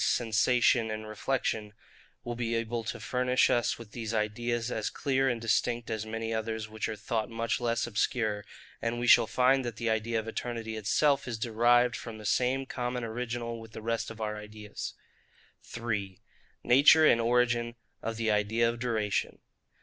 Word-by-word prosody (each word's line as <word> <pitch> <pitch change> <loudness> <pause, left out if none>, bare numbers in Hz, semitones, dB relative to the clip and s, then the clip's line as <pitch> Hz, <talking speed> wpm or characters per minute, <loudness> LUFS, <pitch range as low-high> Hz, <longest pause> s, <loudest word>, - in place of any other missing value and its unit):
sensation 115 0 +3
and 110 0 -5
reflection, 110 -1 -2 0.5
will 120 - -4
be 115 -1 -2
able 115 0 -2
to 110 - -5
furnish 125 0 +2
us 120 -1 +1
with 115 -3 -12
these 115 -1 -4
ideas, 115 +2 -1
as 110 -3 -1
clear 135 -1 +1
and 120 -2 -1
distinct 115 0 0
as 110 -1 -3
many 115 +1 -3
others 110 0 -3
which 110 0 -4
are 110 - -3
thought 110 +1 -2
much 115 +1 -2
less 120 -1 0
obscure; 110 -2 0 0.4
and 115 +1 -1
we 120 - -1
shall 120 -1 +7
find 130 +3 +3
that 120 -2 -4
the 115 +1 -1
idea 110 +1 0
of 110 - -6
eternity 115 -1 -4
itself 135 +7 +2
is 120 -2 -3
derived 120 +2 +3
from 115 -2 -7
the 105 - -10
same 130 +5 +1
common 125 -1 -3
original 115 0 -4
with 110 -1 -13
the - - -7
rest 115 0 -1
of 115 -1 -10
our 105 -1 -3
ideas. 105 0 -7 0.7
3. 105 -5 -4 0.4
Nature 145 +5 +7
and 115 -5 +5
origin 120 0 +1 0.3
of 115 -1 -4
the 115 -1 +1
idea 105 +3 +2
of 115 0 -2
Duration. 110 -5 -1
115 Hz, 175 wpm, -29 LUFS, 110-120 Hz, 0.7 s, shall